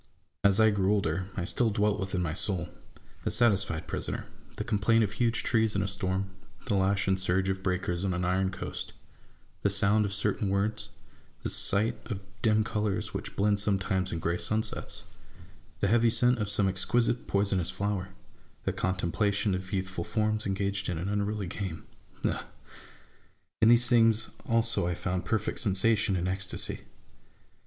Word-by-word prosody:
As 100 +1 +4
I 110 0 +6
grew 100 -1 +1
older, 95 -3 0
1 85 - -2
still 120 +5 +1
dwelt 105 0 +1
within 95 -2 -2
my 80 -2 -2
soul, 90 -1 -1 0.5
a - - 0
satisfied 100 -8 +3
prisoner: - - -3 0.3
the - - -3
complaint 115 0 +2
of 105 - -1
huge 115 +2 0
trees 110 -2 +2
in 100 - +1
a - - -1
storm; 95 0 -2 0.3
the 120 - -1
lash 95 0 +2
and 95 0 +2
surge 95 +1 +1
of 95 0 -2
breakers 90 -1 -1
on 95 - 0
an 90 +1 -1
iron 95 +1 +1
coast; 95 - -6 0.7
the 100 - +2
sound 100 +2 +3
of 100 - -3
certain 100 0 0
words; 105 +2 -1 0.5
the - - +1
sight 110 +4 +2
of 100 - -3 0.2
dim 110 -1 +3
colours 105 -3 -2
which - - -5
blend 100 0 +2
sometimes 95 -2 +1
in 85 - -2
gray 85 +2 -1
sunsets; 110 0 -2 0.8
the - - +3
heavy 115 +3 +4
scent 120 +1 +3
of 105 -2 -1
some 100 -1 +2
exquisite 115 +6 +1
poisonous 100 -3 +1
flower; 95 0 -2 0.6
a - - 0
contemplation 100 +3 0
of 95 0 -4
youthful 95 -2 -2
forms 110 +2 -1
engaged 100 0 -1
in 90 - -2
an 90 +5 -3
unruly 105 0 -1
game; 90 -2 -5 0.2
— - - -10
ah! - - -1 1.1
in 110 - +6
these 120 0 +6
things 115 -2 +3 0.2
also 115 -5 +2
I 90 - -1
found 90 0 -2
perfect 110 -1 -1
sensation 105 +1 +2
and 90 0 -1
ecstacy. 95 0 -3
100 Hz, 165 wpm, -29 LUFS, 95-110 Hz, 1.1 s, I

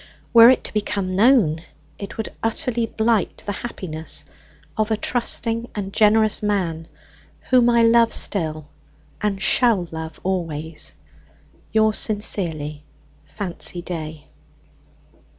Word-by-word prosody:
Were 230 0 +9
it 260 - +3
to - - -4
become 200 -3 -2
known, 205 - +4 0.4
it 200 0 -8
would 220 - -5
utterly 225 +1 0
blight 220 -2 0
the 205 - -2
happiness 185 -7 -5 0.5
of 215 0 0
a 220 - +1
trusting 235 0 0
and 200 -2 -4
generous 215 0 +3
man, 175 -6 -1 0.6
whom 245 -2 +5
I 235 -1 +4
love 230 0 +5
still, 155 -6 -2 0.6
and 205 -2 -1
shall 215 -4 +3
love 160 -1 -7
always. 160 -4 -3 0.8
Yours 220 0 +2
sincerely, 160 -8 -1 0.4
"FANCY 180 -3 -3
DAY. 155 -3 -6
205 Hz, 115 wpm, -21 LUFS, 165-225 Hz, 0.8 s, Were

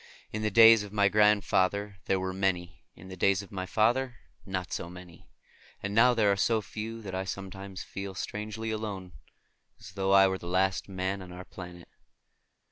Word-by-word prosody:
In 110 - -3
the 110 - +1
days 115 +1 +8
of 105 -1 -8
my 100 -1 +3
grandfather 100 -1 +2
there 95 - +1
were 95 0 -3
many; 90 -2 -1
in 95 - -13
the 95 - -7
days 100 +2 +2
of 100 - -15
my 95 -2 -4
father 120 +5 +1 0.3
not 95 -1 -4
so 85 - -4
many; 90 -1 -13 0.5
and 100 0 -3
now 120 +3 +5
there 105 -3 +3
are - - +2
so 110 +3 +2
few 110 +2 -7
that 95 -2 -7
I 95 +1 -2
sometimes 95 0 -7
feel 100 -1 -7
strangely 110 +3 -4
alone, 100 -4 -5 0.7
as 100 - -11
though 95 0 -1
I 95 0 +7
were 95 0 -2
the 85 - -9
last 95 +2 0
man 95 +1 -3
on 90 -1 -10
our 90 +1 -9
planet. 90 -2 -10
95 Hz, 190 wpm, -29 LUFS, 95-105 Hz, 0.7 s, days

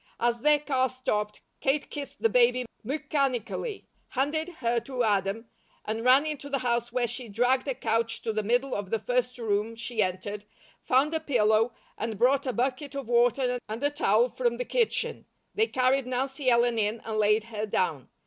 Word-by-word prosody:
As 235 0 +1
their 300 +4 +5
car 265 -3 0
stopped, 210 -5 -2 0.2
Kate 280 +2 0
kissed 285 -2 -7
the - - +7
baby 250 +2 +3 0.2
mechanically, 275 - -2 0.2
handed 300 +5 -1
her 235 -1 +1
to 255 0 -3
Adam, 205 +1 0 0.4
and 220 +1 -3
ran 260 +4 +6
into 295 -2 -4
the 280 - 0
house 235 0 0
where 250 0 +1
she 240 0 -6
dragged 245 +6 +1
a 270 - -1
couch 230 -1 -1
to 225 - -1
the 215 - 0
middle 245 +5 +1
of 205 -2 -3
the 225 - +1
first 250 +3 -1
room 220 -1 -1
she 230 0 -2
entered, 200 +2 -3 0.4
found 275 +5 +2
a 320 - +1
pillow, 225 -5 +2 0.2
and 220 -1 -3
brought 270 +4 +3
a - - +1
bucket 265 +3 -2
of 275 -4 -5
water 245 +1 +2
and 225 +5 -5
a 290 - +2
towel 235 -5 +3
from 240 -1 -1
the 250 - -3
kitchen. 475 -3 -1 0.3
They 440 +2 +2
carried 260 - +1
Nancy 265 +2 -1
Ellen 235 -1 +3
in 215 +2 0
and 220 -1 -3
laid 210 +1 +3
her 220 -1 -4
down. 160 - -1
245 Hz, 185 wpm, -28 LUFS, 225-270 Hz, 0.4 s, the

